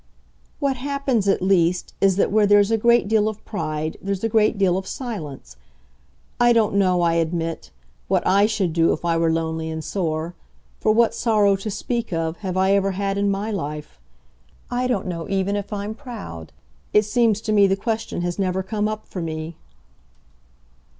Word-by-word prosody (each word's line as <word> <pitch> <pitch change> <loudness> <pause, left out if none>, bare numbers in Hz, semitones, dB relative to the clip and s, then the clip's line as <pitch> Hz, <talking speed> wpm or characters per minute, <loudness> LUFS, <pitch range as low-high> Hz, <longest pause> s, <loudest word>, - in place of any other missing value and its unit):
"What 275 -2 0
happens 270 -5 -1
at 195 - +2
least 180 -2 +2
is 195 -1 +4
that 195 - +1
where 210 0 +4
there's 205 +1 +5
a - - +4
great 235 0 +4
deal 215 0 +2
of 215 -1 -9
pride 155 -6 -3
there's 195 0 -3
a 225 - +1
great 215 0 +2
deal 190 -3 +2
of 190 0 -3
silence. 170 - -7 0.8
I 240 0 +5
don't 225 -3 +2
know, 185 -3 +2
I 170 -1 +3
admit, 165 - -2 0.4
what - - +1
I 200 +2 +4
should 200 -6 -1
do 165 0 +3
if - - -6
I 170 -1 +2
were 165 0 +2
lonely 160 0 -2
and 160 0 -5
sore 165 -2 -2 0.5
for - - +2
what 230 +1 +3
sorrow, 210 -4 +3
to 195 +3 -5
speak 235 +2 -3
of, 165 -1 -2
have 185 -3 -4
I 190 +1 +3
ever 195 -1 +2
had 195 +1 -1
in 200 0 +1
my 200 +3 -2
life? 150 - -5 0.7
I 250 +1 0
don't 230 -7 -1
know 170 -3 -5
even 195 +1 0
if 205 +1 -4
I'm 205 +1 -3
proud 220 - -9 0.4
it 210 0 +4
seems 225 -1 +2
to 215 - -3
me 205 -2 +5
the 195 0 +1
question 220 -3 -3
has 175 +2 -3
never 190 -1 0
come 210 +2 -1
up 215 0 -5
for 185 - -6
me." 160 0 -5
195 Hz, 190 wpm, -22 LUFS, 170-215 Hz, 0.8 s, there's